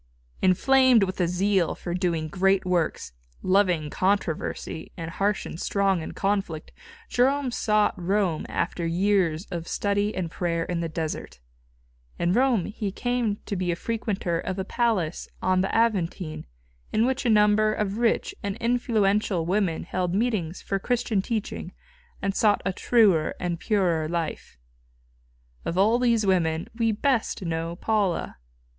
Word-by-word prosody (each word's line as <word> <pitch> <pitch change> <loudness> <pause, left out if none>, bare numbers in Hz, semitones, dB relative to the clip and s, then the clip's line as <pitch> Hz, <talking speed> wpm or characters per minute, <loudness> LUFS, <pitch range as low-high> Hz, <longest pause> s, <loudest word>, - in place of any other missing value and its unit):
Inflamed 255 +5 +5
with 185 -1 -2
a 175 - +2
zeal 185 0 +1
for 175 - -5
doing 170 -3 -1
great 195 +3 +2
works, 170 - -1 0.3
loving 180 -6 +2
controversy 185 -4 -1
and 165 0 -5
harsh 200 +3 0
and 165 - -7
strong 195 -3 +1
in - - -6
conflict, 195 -6 -2 0.4
Jerome 265 +1 +2
sought 215 -3 +2
Rome 185 -3 0
after 170 0 -2
years 175 -1 +1
of 170 -1 -4
study 205 +1 0
and 175 -3 -3
prayer 170 -2 -1
in 175 -1 -2
the 165 -1 -2
desert. 160 - -5 0.8
In 175 +1 +1
Rome 245 -5 +3
he 210 -2 -4
came 245 -1 -1
to 200 - -3
be 180 -1 -1
a - - -1
frequenter 200 -4 -2
of 185 +2 -4
a 190 - -2
palace 205 -9 0
on 185 0 +2
the 190 - 0
Aventine 185 - 0 0.4
in 220 - +2
which 265 +1 0
a 245 - +1
number 210 0 +4
of 210 0 -2
rich 235 -1 +1
and 200 -1 -3
influential 215 -6 +1
women 185 -2 0
held 180 -1 -2
meetings 205 -7 -1
for 195 - -1
Christian 235 -2 0
teaching 220 0 -4 0.5
and 195 0 0
sought 210 0 +2
a 195 - 0
truer 195 -8 +3
and 175 -2 -2
purer 175 -8 +1
life. 165 - -4 1.1
Of 170 - -3
all 220 +5 +4
these 235 -3 +2
women 165 -4 +1
we 225 -1 +1
best 230 -2 0
know 165 0 -3
Paula. 205 -2 -1
195 Hz, 150 wpm, -25 LUFS, 170-215 Hz, 1.1 s, Inflamed